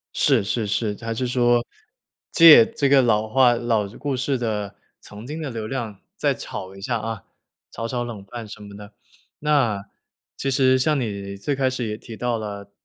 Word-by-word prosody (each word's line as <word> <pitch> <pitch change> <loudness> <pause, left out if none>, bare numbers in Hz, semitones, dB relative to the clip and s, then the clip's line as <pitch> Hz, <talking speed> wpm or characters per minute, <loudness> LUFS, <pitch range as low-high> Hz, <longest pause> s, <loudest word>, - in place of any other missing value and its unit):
是 130 -8 +3
是 110 +3 -1
是。 105 +1 -1
还 115 0 -3
是 125 +3 -2
说， 120 -1 +2 0.7
借 160 -9 +9
这 140 - -1
个 140 0 +6
老 110 -3 +2
话 125 +1 +4
老 115 -3 0
故 140 -2 -2
事 135 +1 -1
的 105 -4 -3 0.3
曾 105 +3 -11
经 155 +3 -5
的 150 - -4
流 110 -2 -5
量 115 -6 -5 0.2
再 - - +1
炒 95 0 -7
一 95 - -12
下 120 +3 -1
啊， 110 -1 -5 0.5
炒 115 - -6
炒 120 0 -2
冷 110 -5 -7
饭 115 +3 -8
什 105 0 -10
么 100 0 -11
的。 105 0 -12 0.5
那 135 -10 +1 0.5
其 135 - -2
实 130 -1 +3
像 150 +1 +2
你 100 -4 -4
最 100 +9 -2
开 135 -1 +1
始 130 -2 -3
也 105 - -4
提 115 0 -10
到 120 0 -1
了， 100 -2 -7
115 Hz, 205 characters per minute, -23 LUFS, 105-130 Hz, 0.7 s, 借